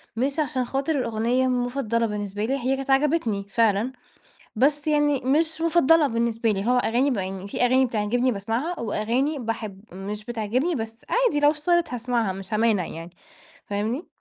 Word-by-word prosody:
مش 275 +6 -1
عشان 260 -4 0
خاطر 275 +5 -1
الأغنية 235 +2 +1
مُفضلة 245 -2 0
بالنسبة 205 0 -3
لي، 270 +3 0
هي 260 +2 0
كانت 270 0 -6
عجبتني 270 -8 +1
فعلًا، 225 +2 +2 0.6
بس 290 +5 +2
يعني 295 -2 +2
مش 315 +4 +1
مُفضلة 325 -2 +4
بالنسبة 230 -1 0
لي، 195 +1 -2
هو 250 +1 +3
أغاني 250 +4 +2
ب 235 - -1
يعني 190 0 -4
في 200 - -4
أغاني 260 +1 +4
بتعجبني 240 +3 0
باسمعها، 230 - -2
وأغاني 245 +7 -1
باحب 220 -4 -4
مش 205 +3 -6
بتعجبني 240 +8 -1
بس 225 -2 -6
عادي 475 -11 +2
لو 290 0 +5
اشتغلت 335 -1 0
هاسمعها، 235 -4 -1
مش 195 +1 -8
هامانع 215 -5 +2
يعني، 165 +2 -8 0.5
فاهمني؟ 220 - -3
245 Hz, 160 wpm, -24 LUFS, 215-280 Hz, 0.6 s, لو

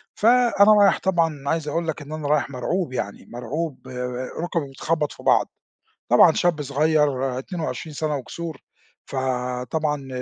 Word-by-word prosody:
فأنا 230 -2 +5
رايح 200 - +5
طبعًا 175 -3 +2
أنا 140 -3 -6
عايز 160 -2 -1
اقول 165 +3 -1
لك 160 - -3
إن 145 +1 -10
أنا 155 -2 -4
رايح 145 -2 +1
مَرعوب 140 +4 -2
يعني 100 -5 -4
مَرعوب 130 +4 -5 0.6
رُكي 175 -1 -1
بتخبّط 150 +2 -1
في - - -13
بعض، - - +4 0.6
طبعًا - - +7
شاب 170 -4 +1
صغير 140 -3 +1
22 160 +1 -5
سنة 150 0 -1
وكسور، 160 +3 -6 0.5
فطبعًا 130 +3 -2
150 Hz, 140 wpm, -23 LUFS, 135-165 Hz, 0.6 s, طبعًا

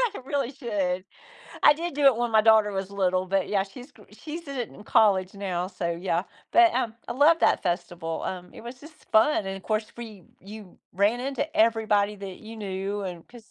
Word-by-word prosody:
I - - -5
really 275 -2 -1
should. 195 -8 -2 0.6
I - - +9
did 340 0 -5
do 290 0 0
it 265 - +6
when 240 0 -1
my 220 -1 +5
daughter 220 -1 +5
was 195 0 -4
little, 185 -1 0
but, 195 0 0
yeah, 195 -2 +1
she's 245 +7 -12
gr - - -19
she's 320 +1 -8
in 275 -1 -6
it 240 -3 -3
in 210 - -14
college 195 -4 +3
now, 185 -3 -3
so, 180 -2 -4
yeah. 170 0 -1 0.3
But, 345 -1 +6
um, 235 -3 -1
I - - -2
love 305 +6 +4
that - - +3
festival, 175 -2 -3
um, 180 -1 -5
it - - -10
was 245 +2 -9
just 310 +2 -13 0.2
fun, 220 -2 +3
and 195 0 -4
of 195 - -11
course, 215 0 -1
free 220 -5 -10 0.2
you 205 -1 -12
ran 205 +6 +2
into 270 +2 -2
everybody 215 -2 +2
that 195 -2 -8
you 225 +1 -10
knew 200 0 -4
and 175 -3 -7
'cause 235 -4 -16
210 Hz, 215 wpm, -26 LUFS, 190-240 Hz, 0.6 s, I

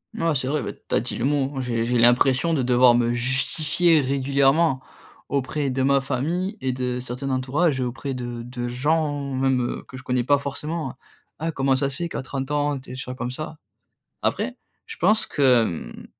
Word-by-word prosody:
Mouais, 165 -8 +1
c'est 130 -1 0
vrai. 150 +2 0
Bah, - - -4
tu - - -4
as - - +4
dit - - -3
le 115 - -1
mot, 140 -1 +1
hein. 135 - -2
J'ai 115 -2 -1
j'ai 125 +1 +1
l'impression 130 +6 +4
de 145 - +1
devoir 125 0 +5
me 120 0 +2
justifier 150 +7 +2
régulièrement 140 +2 +2 0.5
auprès 140 +1 -1
de 130 +1 -1
ma 140 +1 +3
famille 160 +9 -2
et 130 - 0
de 125 -1 -2
certains 125 +2 -4
entourages, 130 +3 +1
auprès 130 +2 -3
de 120 -2 -5
de 120 0 -5
gens 145 +2 0
même 130 -2 0
que 130 - -9
je 130 - -10
connais 125 -1 0
pas 145 +3 +4
forcément, 140 +1 -4
hein: - - -18 0.4
«Ah, 165 +2 -1
comment 135 -3 +2
ça 135 +1 0
se 135 - -6
fait 170 +2 -3
qu'à - - -4
30 135 +1 -5
ans, 145 -1 +1
tu 130 - -15
es - - -6
déjà 130 0 -6
comme 125 -1 -4
ça?» 155 +4 -6 0.7
après, - - -1 0.3
je - - -8
pense 215 +5 +3
que, 145 - -3 0.5
hem, - - -12
135 Hz, 205 wpm, -24 LUFS, 125-145 Hz, 0.7 s, devoir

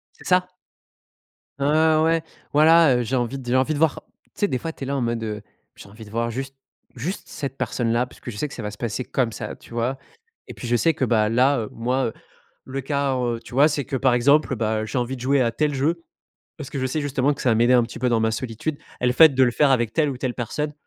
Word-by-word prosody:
C'est - - -16
ça. 180 0 +3 1.1
Ah 155 +2 +3
ouais. 165 0 +2 0.3
Voilà. 160 -1 +6
Heu, 125 - 0
j'ai 125 +3 -1
envie 125 +2 -1
j'ai 120 +1 +1
envie 135 +4 +2
de - - -3
voir, 160 -2 +2 0.3
tu - - -37
sais, 205 - 0
des 130 - -1
fois, 165 +6 -5
tu 140 - -7
es - - -6
là, 140 - -1
en - - -1
mode 115 -1 -1
heu: 105 -2 -5 0.3
«J'ai - - -13
envie 110 +3 -12
de 105 - -14
voir 115 +2 -1
juste 135 +3 -5 0.4
juste 160 - -5
cette 140 -3 -5
personne-là» 120 0 0
parce - - -18
que - - -7
je 105 - -9
sais 150 - -1
que - - -10
ça 115 - -7
va 105 - -4
se 105 - -12
passer 120 +1 -3
comme 120 -1 -1
ça, - - -6
tu - - -18
vois, 120 +3 -1 0.5
et - - -8
puis, - - -8
je 120 - +3
sais 165 +6 +2
que 140 - 0
bah, 110 -3 +2
là, 130 +5 +3
heu, 110 - -4
moi, 125 +3 -1
heu, 110 - -3 0.5
le 135 +1 -4
cas, 140 0 -1
heu, 120 -2 -1
tu - - -13
vois, 140 +4 +6
c'est 145 -3 -2
que, - - -4
par 130 -1 +2
exemple, 140 +6 +3
heu, - - -1
bah, 110 -1 0
j'ai 110 - -4
envie 125 +1 -1
de 125 - -11
jouer 135 +2 +2
à 120 -2 +2
tel 150 +5 0
jeu 165 +5 0 0.5
parce 145 -6 -7
que 140 - -4
je 130 - 0
sais, 155 +4 -2
justement, 140 -1 +1
que - - -11
ça 125 - +3
va - - +3
m'aider 120 +3 +4
un 120 - +5
petit 115 +1 -9
peu 125 - +2
dans 120 -2 +2
ma 110 0 +2
solitude 125 +6 -4 0.2
et 125 - +1
le 125 - +3
fait 160 +4 +8
de 130 - +3
le 120 - +2
faire 145 +3 +3
avec 120 -4 +2
telle 155 -2 +2
ou 135 - -5
telle 125 -1 -2
personne, 150 +5 -3
130 Hz, 280 wpm, -23 LUFS, 120-145 Hz, 1.1 s, fait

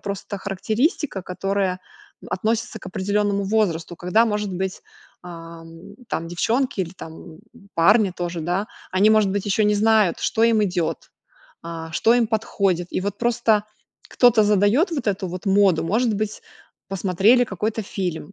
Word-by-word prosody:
просто 200 0 -5
характеристика, 215 - -1
которая 185 0 -2 0.5
относится 225 +3 -2
к 190 - -12
определенному 200 +2 -1
возрасту. 190 -5 0
Когда, 210 +6 +2
может 210 -3 -2
быть, 190 +1 -4 0.4
ам, 165 +2 -11
там 165 +1 -3
девчонки, 230 +6 0
или 175 -1 -3
там, 160 - -9 0.2
м, 160 - -15 0.4
парни 195 +3 +4
тоже, 175 -1 -4
да, 180 +6 -1 0.3
они 200 +3 +4
может 215 -3 +4
быть 200 -1 -2
еще 205 +2 +2
не 210 0 +3
знают, 215 -4 +3
что 225 -1 +1
им 225 -2 +3
идет, 180 -3 -3 0.5
а, 165 -1 -7
что 225 +7 +3
им 240 -2 +3
подходит. 195 -5 0
И - - -2
вот 200 +1 -4
просто 230 -3 +2 0.4
кто-то 240 -3 +4
задает 210 - +3
вот 275 -8 -3
эту 190 -1 -1
вот 180 +1 -7
моду. 195 -4 +3
Может 220 +5 +1
быть, 215 +1 -3 0.5
посмотрели 195 +5 +3
какой-то 215 +1 -3
фильм 190 -2 -5
200 Hz, 150 wpm, -22 LUFS, 180-220 Hz, 0.5 s, парни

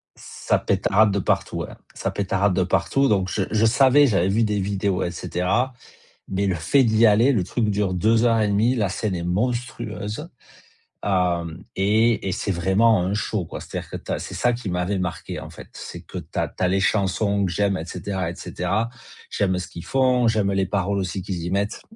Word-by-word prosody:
Ça - - -2
pétarade 105 +1 +2
de 100 - 0
partout, - - -1
ouais. - - -4 0.2
Ça - - -3
pétarade 100 -1 0
de 95 0 +2
partout, 135 +9 +1
donc 95 -4 +1
je 100 - 0
je 110 +1 +2
savais, 135 +4 +5
j'avais 95 -5 +2
vu 110 +4 +2
des 105 -1 0
vidéos 100 -1 -1
et 85 - -2
cetera 95 +9 -1 0.6
mais 100 +1 -1
le 95 - +1
fait 100 - +3
d'y 110 0 +3
aller, 115 +6 +5
le 105 -7 +1
truc 110 +4 -1
dure 100 -2 0
2 110 +5 +3
heures 115 -2 +3
et 105 - +2
1/2, 110 +5 +2
la 105 -4 +1
scène 95 0 -2
est 85 - -4
monstrueuse, 110 - -3 0.7
hem 90 -3 0
et 110 +3 +2
et 95 - -1
c'est 100 - -2
vraiment 95 +3 +3
un 95 +2 -1
show, 105 -2 -1
quoi, - - -7
c'est-à-dire - - -7
que - - -5
tu - - -6
as - - -1
c'est - - -7
ça 120 -1 +1
qui 115 -6 -5
m'avait 90 +2 -1
marqué, 85 -2 -4
en - - -8
fait, - - -12
c'est - - -8
que - - -12
tu - - -7
as - - +1
tu - - -8
as 90 - +3
les 95 +1 +1
chansons 100 0 +1
que 90 - -1
j'aime 100 +1 +1
et 80 - -4
cetera 95 -1 -4
et - - -7
cetera, 100 +6 -2 0.4
j'aime 95 -3 0
ce 90 - -5
qu'ils 85 - -9
font, 130 -2 +2
j'aime 105 -3 +1
les 95 0 +1
paroles 100 +1 -1
aussi 95 0 -2
qu'ils 90 -2 -4
y 90 - -3
mettent, 100 +2 -1
100 Hz, 215 wpm, -23 LUFS, 95-110 Hz, 0.7 s, savais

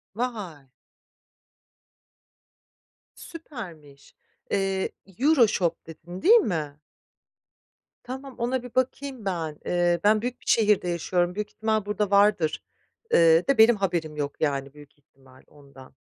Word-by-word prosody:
Vay! 205 - -5 2.5
Süpermiş. 175 - -11 0.4
Eee, 195 -1 -1 0.3
Euroshop 235 - +2
dedin 170 +3 -10
değil 435 +6 +7
mi? 155 - 0 1.2
Tamam 265 +1 -8
ona 245 +1 -1
bir 250 - -11
bakayım 260 -2 -2
ben. 165 -5 -3
Eee, 175 -1 +1
ben 210 +1 +4
büyük 250 +1 -4
bir - - -21
şehirde 210 -5 +3
yaşıyorum, 175 +1 -1
büyük 210 0 -4
ihtimal 220 -1 -1
burada 210 0 -1
vardır, 200 -6 +3 0.5
ııı, 165 0 +5
de 275 - +2
benim 225 +2 +7
haberim 170 -6 -2
yok 145 -1 -5
yani 140 -2 -1
büyük 145 -1 -16
ihtimal 135 -2 -22
ondan. 140 -3 -17
190 Hz, 115 wpm, -25 LUFS, 155-230 Hz, 2.5 s, değil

